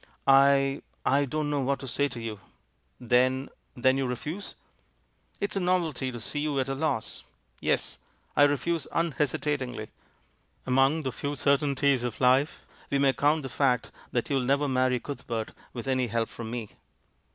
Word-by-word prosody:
"I 135 0 +5
— - - -40
I 145 - +2
don't 150 +2 -2
know 145 -1 +1
what 135 +1 +1
to 135 - -6
say 140 +4 +1
to 125 - -7
you. 110 -3 -5 0.6
Then 130 +2 +2
— - - -43
then 130 +2 +3
you 135 - 0
refuse?" 155 - -5 0.8
"It's 200 +1 -2
a - - +1
novelty 170 -8 0
to 120 - -7
see 145 +6 -3
you 145 -2 0
at 130 0 -1
a - - 0
loss. 135 -5 -2 0.4
Yes, - - -1 0.4
I 145 - +7
refuse 145 +2 0
unhesitatingly. 145 -7 -1 0.8
Among 135 +5 +3
the 130 - -1
few 145 +4 -3
certain 140 0 +2
ties 135 -2 +2
of 120 -2 -3
life 130 +4 +3 0.2
we 140 - +1
may 140 -1 +4
count 150 +2 +2
the - - -3
fact 125 -3 +1 0.2
that 120 - 0
you'll 140 -2 +1
never 140 +3 +2
marry 130 -1 +2
Cuthbert 115 -5 -5 0.2
with 120 +1 -7
any 130 -2 +1
help 115 0 -1
from 115 -2 -7
me." 115 -3 -4
135 Hz, 175 wpm, -28 LUFS, 125-145 Hz, 0.8 s, I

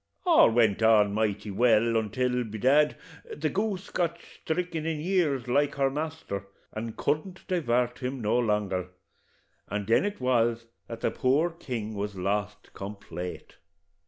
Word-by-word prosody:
All 340 - +7
went 115 -3 +3
on 105 -2 +5
mighty 105 -1 -1
well, 115 +2 +3
antil, 125 +3 0
by 110 0 -6
dad, 145 +7 +3 0.4
the 155 0 -1
goose 200 -1 -2
got 170 -1 0 0.3
sthriken 170 -1 -1
in 160 -1 -2
years 155 -7 0
like 145 +4 +2
her 135 -1 +2
master, 150 - -4 0.3
and 110 +1 -5
couldn't 155 +6 -2
divart 125 -9 0
him 130 +1 -3
no 115 +2 +1
longer, 105 -5 0 0.8
and 105 -1 -3
then 115 +3 +3
it 205 0 -3
was 120 -2 +1 0.2
that 115 -1 -7
the - - +1
poor 145 +7 +2
king 120 -10 -5
was 105 0 -4
lost 105 +2 -3
complate. 95 -3 -7
120 Hz, 145 wpm, -28 LUFS, 105-150 Hz, 0.8 s, All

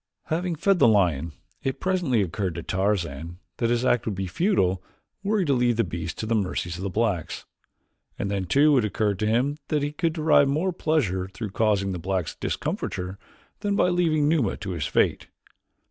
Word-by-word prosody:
Having 170 +1 0
fed 195 +4 +2
the - - +6
lion, 85 -8 +2 0.3
it 135 - -2
presently 175 - +1
occurred 95 0 -3
to 85 - -5
Tarzan 85 -5 -1 0.2
that 115 - 0
his 120 +1 +1
act 120 -2 +2
would 105 - -1
be 95 +1 -3
futile 95 - +1 0.4
were 205 +2 0
he 190 - +1
to 140 - +2
leave 120 -2 +2
the 115 - +3
beast 85 -2 -5
to - - -3
the 115 - 0
mercies 90 -5 -1
of - - -7
the 100 - -2
blacks, 100 -5 -1 0.7
and 100 0 -2
then 100 -2 -1
too 145 - +4
it - - 0
occurred 105 -2 0
to 105 - 0
him 130 +7 +1
that 150 -2 0
he 145 - -1
could 165 +1 -1
derive 155 -3 +4
more 160 +7 0
pleasure 120 - 0
through 95 +2 -6
causing 100 -2 +1
the 90 - -4
blacks 90 -2 -2
discomfiture 90 +2 -3 0.4
than 205 -1 0
by 180 - +3
leaving 165 -4 +2
Numa 150 -10 +1
to 100 -2 -5
his 80 -5 -2
fate. - - +1
110 Hz, 195 wpm, -25 LUFS, 95-150 Hz, 0.7 s, the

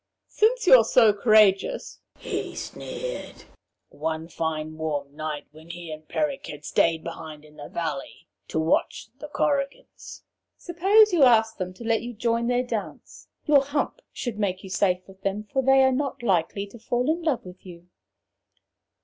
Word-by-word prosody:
'Since 465 +2 +1
you're 255 -9 +8
so 225 -1 +5
courageous,' 215 - +3 0.2
he - - -5
sneered, - - -7 0.5
one 160 +1 -4
fine 155 -2 -3
warm 145 -3 -4
night 155 -1 -5
when 160 +2 -16
he 170 -1 -8
and 155 0 -9
Peric 290 -3 -2
had 150 0 -9
stayed 165 -1 +1
behind 155 -1 -8
in 150 0 -19
the 145 - -9
valley 155 -5 -5 0.2
to 160 - -2
watch 160 +6 0
the 300 - -7
Korrigans, 290 - -3 0.3
'suppose 390 +4 +4
you 340 - +3
ask 225 -4 +5
them 185 -2 -4
to 235 - -10
let 230 -1 +1
you 240 +1 -6
join 230 +1 0
their 245 0 +1
dance. - - -6 0.2
Your 290 -3 +5
hump 285 - -2
should 235 -4 -5
make 190 -3 -1
you 190 - -9
safe 185 -1 +1
with 190 0 -16
them, 195 +2 -2
for 265 - +2
they 270 +1 +5
are 265 - +4
not 270 -1 -2
likely 195 -1 0
to 205 +4 -14
fall 245 +3 -1
in 325 +3 +1
love 310 - -1
with 180 0 -12
you.' 175 -1 -13
215 Hz, 165 wpm, -25 LUFS, 165-270 Hz, 0.5 s, you're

